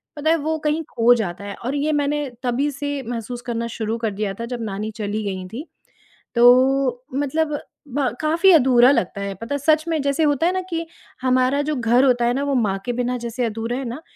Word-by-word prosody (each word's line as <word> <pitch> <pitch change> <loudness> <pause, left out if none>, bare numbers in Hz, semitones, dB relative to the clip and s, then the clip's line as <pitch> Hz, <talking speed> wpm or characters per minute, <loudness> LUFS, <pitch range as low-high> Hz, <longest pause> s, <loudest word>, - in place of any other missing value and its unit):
पता 305 +1 -1
है 325 - +5
वो 315 +1 -1
कहीं 305 +2 0
खो 235 +1 +4
जाता 195 -4 -4
है 200 -1 -6
और 265 +3 -1
ये 290 +2 0
मैंने 295 -1 0
तभी 255 +4 0
से 285 0 -4
महसूस 240 0 -5
करना 235 -1 -2
शुरू 225 0 -3
कर 225 -2 -2
दिया 200 0 -3
था 230 - -3
जब 240 0 -5
नानी 215 +1 -4
चली 215 0 -3
गई 190 -2 -4
थीं, 230 +9 -7 0.7
तो 250 +1 +4
मतलब 290 +2 0 0.4
ब 285 -2 +1
काफ़ी 330 +5 +4
अधूरा 255 -4 +6
लगता 200 -6 -1
है। 200 0 -3
पता 230 +5 -3
है, - - -2
सच 310 +2 +3
में 320 -2 0
जैसे 280 +3 +1
होता 290 +1 +2
है - - +2
ना 375 - -1
कि 330 -1 -2 0.4
हमारा 255 +2 +2
जो 305 +1 -1
घर 245 +1 +3
होता 245 -2 +3
है 240 - +2
ना, 275 +3 -1
वो 285 -1 -1
माँ 210 -6 +1
के 245 - -1
बिना 250 +1 -1
जैसे 240 +1 -3
अधूरा 225 +2 -3
है 270 - -4
ना, 250 +6 -6
255 Hz, 225 wpm, -21 LUFS, 230-290 Hz, 0.7 s, अधूरा